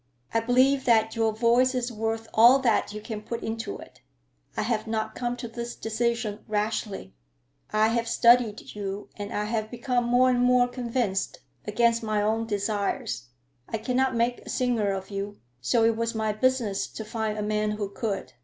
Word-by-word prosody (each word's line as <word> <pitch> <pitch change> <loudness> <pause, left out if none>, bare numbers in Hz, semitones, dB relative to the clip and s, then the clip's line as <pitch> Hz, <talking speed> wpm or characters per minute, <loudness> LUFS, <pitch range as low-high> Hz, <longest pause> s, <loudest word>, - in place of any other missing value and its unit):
"I 225 - +3
believe 255 +4 +3
that 225 -2 +3
your 225 -1 +2
voice 240 +4 +3
is 250 -1 -1
worth 225 0 -3
all 235 +4 +8
that 250 -6 +1
you 210 - -6
can 215 0 -6
put 230 +2 -5
into 225 - -4
it. - - -14 0.6
I - - +1
have 220 -1 -1
not 220 -1 -2
come 245 0 -3
to 240 - -5
this 235 +1 -6
decision 225 -1 -1
rashly. 210 - -2 0.6
I 215 +1 +3
have 230 0 0
studied 235 -3 +3
you, 200 0 -5
and 205 -1 -6
I 210 - -1
have 215 0 -2
become 245 0 -1
more 250 +2 +4
and 245 - +1
more 250 0 +4
convinced, 235 -5 -2 0.3
against 230 +2 +2
my 215 -2 0
own 220 +2 0
desires. 200 - -2 0.4
I 225 - -1
cannot 255 +3 0
make 235 +1 +1
a - - -12
singer 240 -5 +1
of 190 +1 -5
you, 200 +1 -4 0.2
so 225 - +2
it 225 0 +4
was 230 0 -2
my 220 -1 0
business 225 -3 +1
to 220 - -8
find 220 -1 -2
a 210 - -2
man 210 0 0
who 210 -1 -3
could. 200 0 -4
225 Hz, 180 wpm, -26 LUFS, 210-240 Hz, 0.6 s, all